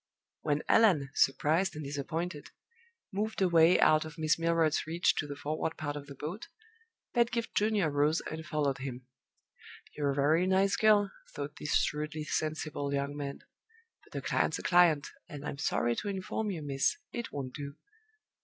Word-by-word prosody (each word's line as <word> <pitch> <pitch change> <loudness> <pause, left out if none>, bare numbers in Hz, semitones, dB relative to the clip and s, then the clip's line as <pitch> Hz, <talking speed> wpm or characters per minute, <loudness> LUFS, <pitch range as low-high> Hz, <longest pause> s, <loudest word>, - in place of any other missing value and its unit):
When 150 0 0
Allan 175 -12 +4
surprised 160 +7 +2
and 150 -1 -6
disappointed 145 +3 -4 0.6
moved 215 +3 -2
away 170 -2 +5
out 155 0 +5
of 155 0 -10
Miss 155 0 +1
Milroy's 165 -2 +1
reach 170 +2 +2
to 145 - -1
the 145 - -5
forward 155 +3 -3
part 145 -2 -3
of 145 -1 -7
the 140 - -9
boat, 175 - -6 0.7
Pedgift 235 -1 +1
Junior 205 -6 +2
rose 145 +3 +2
and 160 +1 -6
followed 145 -4 -1
him. 130 -2 -6 0.9
"You're 145 -1 0
a 140 - 0
very 155 +6 +3
nice 190 +1 +3
girl," 210 -2 +4 0.2
thought 145 +1 -5
this 150 - -1
shrewdly 150 +1 0
sensible 155 -2 -2
young 140 0 -1
man; 140 -1 -5 0.6
"but - - -17
a - - -4
client's - - +1
a - - -8
client; 175 -5 +4 0.2
and 145 0 -8
I - - -2
am 140 - -9
sorry 120 -4 +1
to - - -3
inform 200 +2 -3
you, 170 -6 -4
miss, 135 -2 +1
it 235 -1 -5
won't 130 -3 -5
do." 140 -1 -7
155 Hz, 170 wpm, -31 LUFS, 145-180 Hz, 0.9 s, away